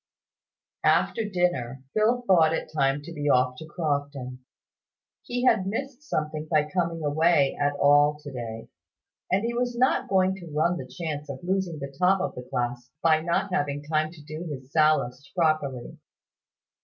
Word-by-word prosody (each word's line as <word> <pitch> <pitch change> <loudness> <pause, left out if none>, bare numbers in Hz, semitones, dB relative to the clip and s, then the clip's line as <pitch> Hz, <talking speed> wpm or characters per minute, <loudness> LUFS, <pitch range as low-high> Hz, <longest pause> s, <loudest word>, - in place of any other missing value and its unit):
After 220 -2 +2
dinner, 135 - -1
Phil 230 +3 +2
thought 165 -6 +5
it - - -5
time 140 0 +1
to 170 - -8
be 145 -2 -2
off 125 -1 +3
to 160 - -9
Crofton. 145 -5 -3 0.8
He 245 +1 -3
had 220 -7 +3
missed 265 +6 -4
something 155 - -3
by 150 -2 +2
coming 170 -3 -1
away 150 -1 +3
at 145 0 +2
all 145 +1 +4
to 145 - -7
day; 115 -3 -6 0.6
and 195 +4 +2
he 235 - -1
was 245 0 -1
not 260 +2 +2
going 190 -1 +3
to 175 -3 -10
run 165 +4 +1
the 130 - -7
chance 150 -2 -5
of 135 +1 -7
losing 185 -3 -1
the 140 -1 -7
top 190 +2 +4
of 190 - -2
the 125 - -7
class 120 0 -3
by 160 -1 +4
not 175 +3 -1
having 145 -4 -1
time 155 +1 0
to 155 -4 -14
do 155 +3 -7
his 130 -3 -8
Sallust 150 -4 +2
properly. 155 -7 0
155 Hz, 165 wpm, -26 LUFS, 140-180 Hz, 0.8 s, thought